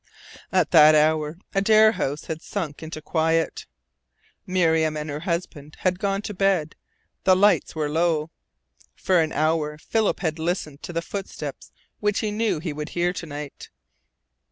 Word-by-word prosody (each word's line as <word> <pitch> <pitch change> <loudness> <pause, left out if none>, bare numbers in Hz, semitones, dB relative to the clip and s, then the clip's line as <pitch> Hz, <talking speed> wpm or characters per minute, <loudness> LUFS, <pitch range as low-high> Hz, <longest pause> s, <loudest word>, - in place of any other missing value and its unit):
At 185 -4 +2
that 155 -2 +8
hour 155 +1 +2 0.2
Adare 215 +2 +5
House 145 -8 -3
had 160 -1 -5
sunk 170 -8 -5
into 155 -1 -7
quiet. 165 0 0 0.8
Miriam 160 -4 +2
and 150 0 -4
her 145 - -4
husband 165 -3 -4
had 185 -1 +1
gone 195 0 -1
to 210 - -5
bed, 185 -5 +1 0.5
the 185 - +5
lights 200 -1 +3
were 155 -1 -1
low. 160 0 0 0.6
For 185 -3 +2
an 160 -1 -1
hour 155 -1 0
Philip 220 +7 0
had 160 -3 -2
listened 160 -4 -2
for - - -6
the 165 0 -2
footsteps 195 +2 -7 0.3
which 210 -1 0
he 215 - -1
knew 215 -3 0
he 160 -1 -4
would 150 +1 -5
hear 175 +1 0
to 175 - -6
night. 145 -1 -8
165 Hz, 155 wpm, -24 LUFS, 155-185 Hz, 0.8 s, that